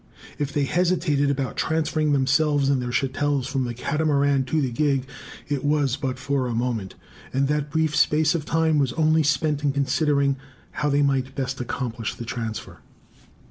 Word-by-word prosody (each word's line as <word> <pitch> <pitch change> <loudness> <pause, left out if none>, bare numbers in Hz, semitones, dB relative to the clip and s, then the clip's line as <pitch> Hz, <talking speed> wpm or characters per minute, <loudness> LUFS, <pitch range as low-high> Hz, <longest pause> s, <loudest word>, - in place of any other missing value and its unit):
If 145 -1 -1
they 145 - 0
hesitated 165 -3 +1
about 135 -2 -2
transferring 155 -1 0
themselves 140 +1 +2
and 135 -2 +2
their 125 - -3
chattels 135 +1 0
from 135 -1 -1
the 120 -1 -4
Catamaran 140 0 +1
to 155 +5 0
the 130 -4 0
gig, 135 0 +1 0.4
it 145 -1 -2
was 145 -3 +1
but 135 -3 -3
for 135 0 -1
a 120 - -2
moment; 115 -5 -2 0.4
and 135 +1 +1
that 150 0 0
brief 155 0 0
space 155 0 +3
of 165 -3 -2
time 160 0 +2
was 135 -3 +1
only 160 0 +3
spent 150 0 +1
in 145 - +2
considering 140 0 +1 0.3
how 150 - -1
they 145 0 +3
might 135 -1 0
best 135 -1 -3
accomplish 120 -3 -3
the 120 - -7
transfer. 115 -2 -5
140 Hz, 175 wpm, -24 LUFS, 130-150 Hz, 0.4 s, space